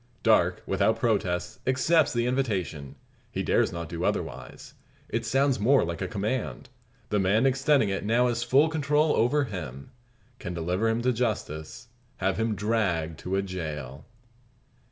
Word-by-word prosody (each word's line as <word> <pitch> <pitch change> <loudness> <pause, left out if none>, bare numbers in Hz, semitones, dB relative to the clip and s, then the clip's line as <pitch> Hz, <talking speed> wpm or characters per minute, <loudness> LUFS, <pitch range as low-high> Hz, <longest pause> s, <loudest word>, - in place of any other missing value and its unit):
Darke, - - +3
without 110 0 +1
protest, 100 -7 -1
accepts 155 +5 +3
the 120 0 0
invitation. 100 - -2 0.4
He - - -2
dares - - +2
not 85 -1 -5
do 85 0 -5
otherwise. 65 +1 -4 0.4
It - - -2
sounds 135 -2 +2
more 130 +6 +4
like 85 0 -5
a - - -1
command. 105 - -3 0.4
The 105 - +1
man 100 +6 +3
extending 135 -3 +3
it 95 - -2
has - - -9
now 120 +2 +3
full 125 +6 +3
control 150 -1 +1
over 135 +6 +2
him; 75 - -7 0.5
can 90 -3 -5
deliver 90 +6 0
him 115 +1 0
to 125 0 +2
justice 110 -3 -3 0.3
have 95 0 0
him 110 -1 0
dragged 95 -8 -1
to 95 +1 -3
a 95 - +1
jail. 75 -7 -6
110 Hz, 155 wpm, -27 LUFS, 85-125 Hz, 0.5 s, more